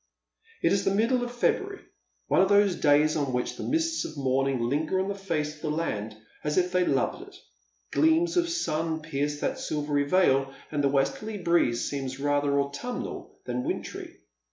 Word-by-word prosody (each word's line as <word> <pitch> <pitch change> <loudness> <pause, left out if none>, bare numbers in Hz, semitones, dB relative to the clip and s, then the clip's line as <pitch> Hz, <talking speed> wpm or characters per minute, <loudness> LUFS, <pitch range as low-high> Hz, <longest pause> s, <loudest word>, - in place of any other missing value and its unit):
" 455 0 -30
It - - +4
is 195 - +1
the 195 - +1
middle 240 +4 +2
of 245 - -3
February, 245 0 -1 0.4
one - - +3
of 190 - +3
those 205 -2 +4
days 150 +1 +4
on 140 -4 -1
which 125 0 -1
the - - -6
mists 325 +1 0
of 155 - -7
morning 135 -1 +1
linger 150 +9 0
on 190 +1 -1
the - - -1
face 165 -6 -3
of 150 - -19
the 155 - -2
land, 110 -9 -3 0.3
as 150 0 -1
if 180 0 +2
they 180 0 +3
loved 135 -7 0
it. - - -13 0.6
Gleams 325 +2 +3
of 345 -1 +2
sun 160 - -1
pierce 145 -1 -2
that - - -1
silvery 145 -1 -1
veil, 135 -5 +3 0.2
and 145 -2 0
the 140 - +4
westerly 140 +11 -1
breeze 170 -10 +2
seems 135 -2 -4
rather 145 0 +1
autumnal 145 +14 -4
than 125 0 -2
wintry. - - -5
155 Hz, 185 wpm, -27 LUFS, 140-195 Hz, 0.6 s, It